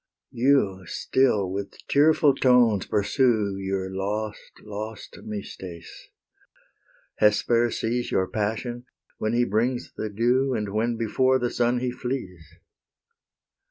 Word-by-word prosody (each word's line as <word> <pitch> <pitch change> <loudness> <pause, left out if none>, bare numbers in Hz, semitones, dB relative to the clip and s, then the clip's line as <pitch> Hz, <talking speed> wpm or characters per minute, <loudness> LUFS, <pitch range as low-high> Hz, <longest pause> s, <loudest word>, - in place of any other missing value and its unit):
You 120 -7 +2
still 105 -7 +1
with 100 +1 -5
tearful 150 0 +4
tones 125 -6 +3
pursue 105 -2 +1
Your 95 -1 -3
lost, 105 +2 -4
lost 105 +1 -7
Mystes; 95 -4 -8 1.1
Hesper 115 +3 +3
sees 120 +2 -2
Your 95 - +1
passion 115 +4 -3 0.3
when 110 +1 -1
he 120 +1 +3
brings 120 +5 -1
the 110 - -4
dew, 125 +5 +1
And 105 -2 -2
when 115 +3 -1
before 130 +4 +2
the 120 -1 -2
sun 120 0 +1
he 125 -1 -1
flees. 120 - -6
110 Hz, 115 wpm, -25 LUFS, 100-125 Hz, 1.1 s, tearful